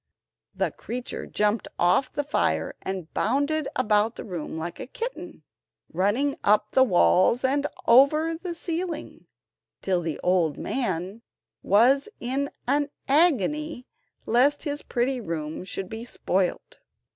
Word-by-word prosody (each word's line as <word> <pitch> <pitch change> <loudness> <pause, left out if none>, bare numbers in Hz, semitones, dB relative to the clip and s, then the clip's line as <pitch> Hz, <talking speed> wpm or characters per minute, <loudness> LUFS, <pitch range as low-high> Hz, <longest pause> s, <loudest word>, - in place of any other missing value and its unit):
The - - 0
creature 245 +1 -6
jumped 210 0 0
off 175 +10 +2
the 290 - -2
fire, 290 - 0
and 190 -4 -5
bounded 285 +5 0
about 215 -2 +2
the - - -7
room 175 -6 -5
like 170 +2 -5
a - - -6
kitten, 475 - -6 0.5
running 205 - +1
up 210 +1 +3
the 260 - +5
walls 195 +2 +4
and 280 +2 +1 0.2
over 305 +7 +5
the 345 +1 -6
ceiling, 335 -1 -5 0.6
till 185 -2 +1
the 160 -3 -4
old 175 -5 +2
man 195 -3 -3 0.4
was 255 - +4
in 270 +4 -1 0.2
an 285 +2 +1 0.2
agony 300 - +2 0.4
lest 270 +5 +3
his 290 -1 -3
pretty 250 +1 -1
room 160 -4 -4
should 190 0 -5
be 220 +3 -7
spoilt. 190 -6 -2
245 Hz, 130 wpm, -25 LUFS, 190-285 Hz, 0.6 s, the